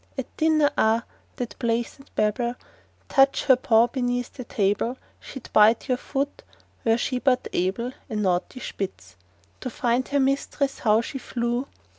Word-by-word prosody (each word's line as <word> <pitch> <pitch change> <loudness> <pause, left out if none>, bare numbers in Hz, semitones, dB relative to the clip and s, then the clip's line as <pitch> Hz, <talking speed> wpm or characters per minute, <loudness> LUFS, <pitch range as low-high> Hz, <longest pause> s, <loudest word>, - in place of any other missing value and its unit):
At 265 - -5
dinner—ah! 290 -8 +3 0.3
that 245 -2 -5
pleasant 235 +4 -2
Babel! 235 +3 0 0.5
Touch 270 -1 +4
her 260 - +7
paw 230 -2 +4
beneath 245 -1 -2
the 255 - -7
table, 215 +3 0 0.2
She'd 265 - -10
bite 215 +4 +5
your 255 -2 0
foot—were 270 -4 -3
she 250 +1 -1
but 255 -1 +2
able— 195 +7 -1 0.2
A 220 - -4
naughty 195 +4 -1
Spitz. 185 - -6 0.4
To 255 - -4
find 245 0 0
her 285 - +1
mistress 275 +1 0
how 215 0 +3
she 270 +3 -6
flew! 240 +1 -2
245 Hz, 140 wpm, -25 LUFS, 225-265 Hz, 0.5 s, her